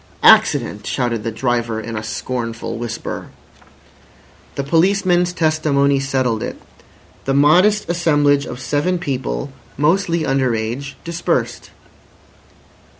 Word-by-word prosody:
"Accident!" - - +4
shouted 115 -3 -1
the 115 - -2
driver 115 -1 -1
in 115 +1 -6
a 110 - -3
scornful 115 +1 -4
whisper. 120 -1 -5 1.3
The 140 - -2
policeman's 180 +3 +2
testimony 155 -4 +1
settled 130 -4 -1
it. - - -5 0.7
The 135 - 0
modest 180 +9 +4
assemblage 145 -5 +2
of - - -7
seven 150 +7 0
people, 130 - -3 0.3
mostly 170 +2 +1
under 135 -3 +1
age, 120 +6 -4
dispersed. 165 -8 -2
140 Hz, 105 wpm, -19 LUFS, 120-165 Hz, 1.3 s, Accident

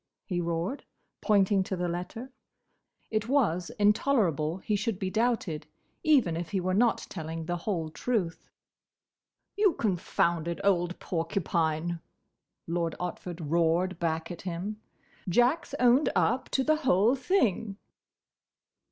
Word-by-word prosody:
he 180 -3 -1
roared, 170 - -2 0.4
pointing 200 -2 +3
to 190 0 -2
the 180 0 -1
letter. 180 +9 -5 0.8
It 215 0 0
was 205 - +1
intolerable 205 - +2
he 210 +2 -1
should 210 0 -1
be 190 -1 -3
doubted, 220 -9 0 0.3
even 265 - +3
if 170 0 -4
he 195 - 0
were 185 +1 -1
not 230 +4 +2
telling 160 -2 -5
the 175 +1 -2
whole 170 -3 -2
truth. 185 -4 -2 1.1
"You 410 -3 +4
confounded 170 - 0
old 180 -3 +2
porcupine," 165 -1 -1 0.7
Lord 170 -1 -1
Otford 180 -1 -5
roared 170 +2 +2
back 165 0 -1
at 170 - -7
him, 190 +4 -5 0.5
"Jack 245 - +3
's - - -7
owned 250 +3 +5
up 260 +1 +1
to 265 - +1
the 310 +3 +3
whole 235 - +3
thing!" 230 - +1
185 Hz, 125 wpm, -29 LUFS, 170-225 Hz, 1.1 s, owned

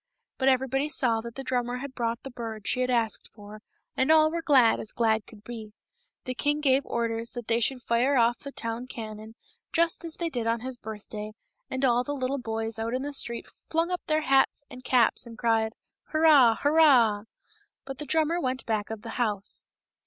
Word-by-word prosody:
But 265 0 +4
everybody 270 +2 +1
saw 235 -6 +2
that 235 0 -9
the 270 - -5
drummer 250 -1 -1
had 275 +1 -7
brought 235 -2 -2
the 270 - -7
bird 225 -3 -6
she 255 - +1
had 255 - 0
asked 230 -3 0
for, 210 0 -11 0.3
and 260 +4 +2
all 310 0 +6
were 335 - -2
as - - -8
glad 260 -7 +5
as 220 - -4
glad 220 -2 +1
could 210 -2 -15
be. 220 -2 -8 0.5
The 255 - -3
king 290 +3 0
gave 275 -2 +3
orders 230 0 -2
that 240 -2 -6
they 230 0 +2
should 250 +1 0
fire 245 +5 +2
off 235 0 +3
the 280 - -8
town 230 0 -4
cannon, 220 -2 -8 0.4
just 335 0 +1
as 330 -2 -4
they 335 -1 -3
did 240 -4 -2
on 230 0 0
his 255 -1 -6
birth 215 -2 -8
day, 215 0 -6 0.4
and 260 +1 -1
all 245 -1 +3
the 290 +2 -4
little 270 +1 -2
boys 225 -1 -3
out 230 +2 -2
in 260 - -2
the 290 0 -4
street 235 -3 -2 0.2
flung 330 +2 0
up 360 - -2
their 310 0 +2
hats 270 0 +2
and 255 0 -10
caps 245 -1 +2
and 230 -1 -11
cried, 225 -1 +1 0.2
" - - -65
Hurrah! 300 -8 +6
Hurrah 265 -9 +5 0.3
!" - - -39
But 270 -1 -7
the 300 - -6
drummer 320 +4 +1
went 255 -2 -1
off - - -44
back 215 -2 -1
of 220 -1 -6
the 230 - -7
house. 205 -4 -2
245 Hz, 220 wpm, -27 LUFS, 225-275 Hz, 0.5 s, all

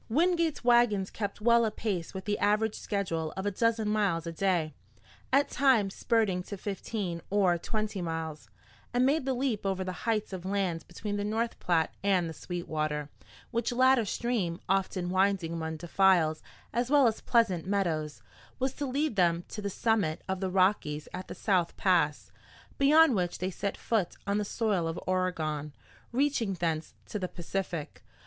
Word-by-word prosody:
Wingate's 335 +3 +2
wagons 235 -5 +3
kept 205 -1 -4
well 235 +1 +5
apace 210 -5 -2
with 190 -1 -7
the 205 -1 -1
average 215 +1 +2
schedule 165 -6 -2
of 190 - -3
a 205 - +1
dozen 225 +1 +1
miles 200 -6 +1
a 165 - -3
day, 165 -3 0 0.6
at 275 +2 +4
times 240 -8 +3
spurting 220 -6 +1
to 200 +3 -7
fifteen 195 -3 -4
or 195 -3 +3
twenty 215 0 -3
miles, 160 -2 -4 0.5
and 250 +1 +4
made 280 +1 +2
the 265 - +1
leap 245 -5 -1
over 190 -1 -1
the 185 +2 -6
heights 215 -3 0
of 185 -2 -5
land 190 -4 -1
between 205 +3 -4
the 205 - -1
North 225 +3 -1
Platte 165 -3 +1
and 190 -4 +2
the 160 - -5
Sweetwater, 155 -4 -3 0.4
which 235 +1 0
latter 255 0 +4
stream, 205 -5 -1
often 185 -1 0
winding 190 -3 +1
among 160 -1 -3
defiles 175 -2 +3 0.3
as 240 +1 0
well 285 -2 +5
as 225 -2 +1
pleasant 190 -8 +2
meadows, 165 -7 -1 0.3
was 265 0 -1
to 285 0 -3
lead 280 0 0
them 170 -2 +2
to 210 - -6
the 200 - -2
summit 200 -6 0
of 190 0 -2
the 190 -1 -1
Rockies 185 -5 +1
at 185 +1 -6
the - - -7
South 180 -5 0
Pass, 165 -6 +1 0.5
beyond 300 +1 +6
which 180 -4 -1
they 185 +2 -2
set 200 +2 -3
foot 215 -7 -1
on 200 +1 +1
the 210 - -1
soil 205 -6 0
of 165 - -3
Oregon, 160 -5 -1 0.4
reaching 245 -5 +1
thence 165 -2 -2
to 210 - -4
the 185 - -2
Pacific. 175 -3 -4
195 Hz, 170 wpm, -29 LUFS, 175-225 Hz, 0.6 s, beyond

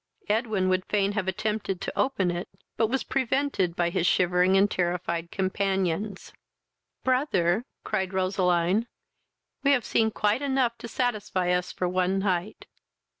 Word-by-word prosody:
Edwin 215 -3 +1
would 185 0 +1
fain 200 -1 +1
have 205 -2 -2
attempted 195 0 -2
to - - -4
open 200 -10 +1
it, 175 +1 -4 0.3
but 225 - +2
was 265 +4 -1
prevented 260 -9 0
by 170 -1 +1
his 170 - +1
shivering 180 +1 +3
and 200 +1 +3
terrified 170 -1 -1
companions. 190 0 -1 0.7
"Brother, 240 - +1 0.2
(cried 190 -3 -1
Roseline,) 185 +2 +1 0.7
we 280 0 +4
have 250 -4 +1
seen 220 -1 +2
quite 215 +3 0
enough 265 -4 +1
to - - -7
satisfy 215 -7 -1
us 180 0 0
for 180 - -2
one 185 +1 +1
night." 195 +1 -2
195 Hz, 140 wpm, -27 LUFS, 180-220 Hz, 0.7 s, we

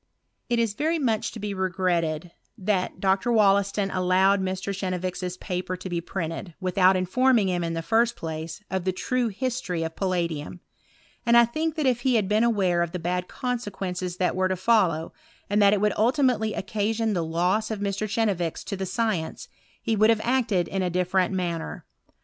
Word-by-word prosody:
It 240 - +2
is 230 -3 +1
very 315 +8 0
much 230 -7 0
to 225 - -7
be 205 -1 -3
regretted, 180 -3 -1 0.3
that 190 -3 -1
Dr. 195 +5 +1
Wollaston 200 -2 +3
allowed 190 +2 +3
Mr. 190 +1 -3
Chenevix's 185 -1 -3
paper 185 -1 -4
to 185 +1 -7
be 170 -1 -2
printed, 165 0 -5
without 185 0 +3
informing 220 +3 +3
him, 175 -1 0
ia 165 - -1
the 165 0 -3
first 230 +4 +2
place, 160 +4 -6
of 190 -1 -1
the 185 - +1
true 250 +6 0
history 210 -7 -2
of 160 0 -5
palladium: 175 -4 -2 0.6
and 235 0 +5
I 235 - +8
think 310 +7 -2
that 310 -3 -1
if 250 -2 +2
he 255 -1 +2
had 210 -4 +2
been 210 +3 +2
aware 195 -7 +2
of 170 0 -2
the 175 -2 -4
had 180 0 -2
consequences 195 -7 -4
that 180 - +1
were 185 0 +2
to 185 - -1
follow, 185 -5 +2 0.4
and 205 +1 +3
that 200 -1 +6
it 205 - +2
would 210 0 +2
ultimately 240 -2 +2
occasion 215 +3 -1
the 175 -3 0
loss 180 +7 0
of 220 -2 -3
Mr. 200 +1 -2
Chenevix 195 -7 -1
to - - -4
the 190 0 -4
science, 190 -5 -2 0.3
he 225 - +1
would 215 +1 +4
have 225 -1 +3
acted 230 -8 +1
in 195 - -2
a 180 - 0
different 180 +1 +1
manner. 175 -3 -3
190 Hz, 185 wpm, -25 LUFS, 180-220 Hz, 0.6 s, I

